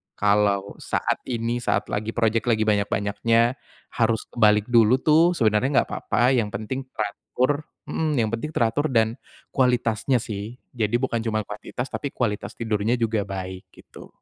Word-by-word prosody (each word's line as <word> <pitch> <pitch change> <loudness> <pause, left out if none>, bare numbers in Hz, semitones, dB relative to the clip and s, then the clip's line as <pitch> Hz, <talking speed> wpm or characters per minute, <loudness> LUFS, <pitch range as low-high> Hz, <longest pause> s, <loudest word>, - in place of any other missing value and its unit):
Kalau 100 -1 +1
saat - - -1
ini 120 0 -1
saat - - 0
lagi 110 +2 -2
projek 115 0 +1
lagi 110 -2 +3
banyak-banyaknya 105 +4 +1 0.4
harus 115 -1 +1
kebalik 105 -2 +3
dulu 115 +1 +6
tuh 160 +3 +5
sebenernya 110 +2 +2
enggak - - -7
papa 125 +2 +1
yang 120 -5 +2
penting 130 +6 -5
teratur 110 +5 -1 0.3
mhm, 155 -2 -1
yang 115 -4 +1
penting 115 +7 -3
teratur 120 +6 +1
dan 115 -1 +1 0.3
kualitasnya 125 -1 +1
sih. 105 +3 -6 0.2
Jadi 115 -2 -1
bukan 120 -2 0
cuman 110 -2 -1
kuantitas, 105 +5 -6
tapi 140 - -3
kualitas 105 -4 -2
tidurnya 110 +1 0
juga 110 -3 -1
baik, 95 -1 -6
gitu. - - -14
115 Hz, 150 wpm, -24 LUFS, 105-125 Hz, 0.4 s, dulu